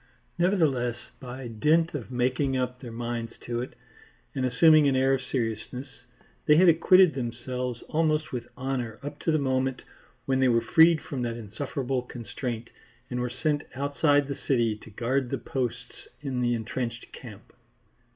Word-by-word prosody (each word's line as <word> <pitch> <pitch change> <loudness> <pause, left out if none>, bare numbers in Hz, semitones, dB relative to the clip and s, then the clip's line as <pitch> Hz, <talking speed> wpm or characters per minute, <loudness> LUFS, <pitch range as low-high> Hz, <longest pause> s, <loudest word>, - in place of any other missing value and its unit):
Nevertheless 150 - +2 0.2
by 130 0 -7
dint 155 +9 +2
of 135 -6 -5
making 130 +2 0
up 125 0 -2
their 120 -3 -8
minds 115 0 -4
to 120 0 -3
it 125 - -7 0.6
and 130 - -2
assuming 150 +4 +6
an 135 - +2
air 135 +1 +3
of 135 - 0
seriousness, 120 +1 -3 0.6
they 150 - +7
had 180 +4 +6
acquitted 175 +1 +6
themselves 125 0 -4
almost 155 -1 0
with 120 -2 -4
honour 125 -4 -3
up 145 +1 -6
to 165 - 0
the 155 - +3
moment 130 -2 0 0.4
when 130 0 +1
they 130 - +4
were 115 -1 +4
freed 160 +7 +5
from 135 -3 -5
that 120 -1 -2
insufferable 130 +4 -3
constraint 120 0 -6 0.4
and 125 - -2
were 125 0 -1
sent 145 +4 0
outside 145 +1 +2
the 140 - -5
city 120 -5 +2
to 110 - -14
guard 120 +4 -1
the - - -1
posts 125 -1 -4
in 135 -4 -3
the 120 -1 +2
entrenched 120 +1 -4
camp. 110 -4 -12
130 Hz, 160 wpm, -27 LUFS, 120-145 Hz, 0.6 s, they